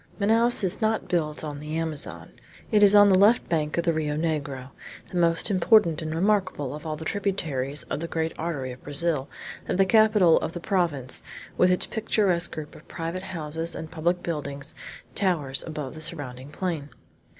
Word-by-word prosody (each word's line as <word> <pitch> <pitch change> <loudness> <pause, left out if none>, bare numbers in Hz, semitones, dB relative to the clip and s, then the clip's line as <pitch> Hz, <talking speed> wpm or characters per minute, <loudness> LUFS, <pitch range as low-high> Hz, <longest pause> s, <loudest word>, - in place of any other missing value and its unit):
Manaos 225 +3 +3
is 190 +3 -1
not 220 0 0
built 155 -4 -1
on 145 -2 -5
the 150 +2 -4
Amazon. 160 -3 -5 0.4
It 210 -2 +4
is 205 0 +7
on 205 0 +8
the 185 -1 +5
left 215 +4 +4
bank 155 -2 -1
of 170 - +1
the 170 - +2
Rio 150 -1 -1
Negro, 140 -5 -3 0.4
the 180 - -3
most 170 +3 +2
important 185 -3 +4
and 155 0 -3
remarkable 185 -7 0
of 150 +2 -7
all 155 - -2
the 160 +1 -8
tributaries 155 -9 -2
of - - -4
the 170 - -4
great 160 -1 -2
artery 145 -6 -3
of 125 - -11
Brazil, 145 -1 -1 0.4
that - - -1
the 195 - +5
capital 210 -4 +5
of 160 - -4
the 175 - -5
province, 165 - -1 0.3
with 180 - +4
its 180 - +3
picturesque 205 -6 +1
group 155 -1 -7
of - - -15
private 165 +2 -4
houses 165 -3 -4
and 160 - -7
public 175 +2 -1
buildings, 140 -4 -5 0.4
towers 155 -9 0
above 150 -4 -5
the 155 - -9
surrounding 140 -5 -3
plain. 155 -3 -3
165 Hz, 185 wpm, -26 LUFS, 150-185 Hz, 0.4 s, on